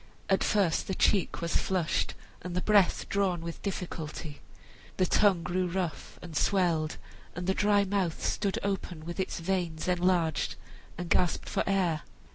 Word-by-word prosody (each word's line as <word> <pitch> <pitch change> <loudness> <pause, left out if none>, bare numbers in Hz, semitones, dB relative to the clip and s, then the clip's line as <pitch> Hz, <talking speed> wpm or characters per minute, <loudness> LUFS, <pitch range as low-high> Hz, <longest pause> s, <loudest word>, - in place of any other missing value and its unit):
At 190 - +4
first 195 -6 +2
the 190 - -2
cheek 195 -2 +2
was 170 0 -2
flushed, 180 -4 0 0.3
and 180 -1 -5
the 180 - +1
breath 205 -3 +3
drawn 190 -4 +1
with 170 0 -6
difficulty. 165 -5 -5 0.6
The 185 - +3
tongue 190 -3 +3
grew 180 +3 0
rough 175 -2 -3
and 170 -3 -8
swelled, 170 -4 +1 0.4
and 175 - -4
the 190 - +2
dry 205 0 +3
mouth 190 -4 -1
stood 200 -2 0
open 185 -5 -3
with 170 +3 -6
its 190 - -2
veins 170 -2 -2
enlarged 180 -3 +1 0.4
and 175 0 -4
gasped 175 0 +1
for - - 0
the - - -2
air. 180 -6 +1
180 Hz, 160 wpm, -29 LUFS, 170-195 Hz, 0.6 s, At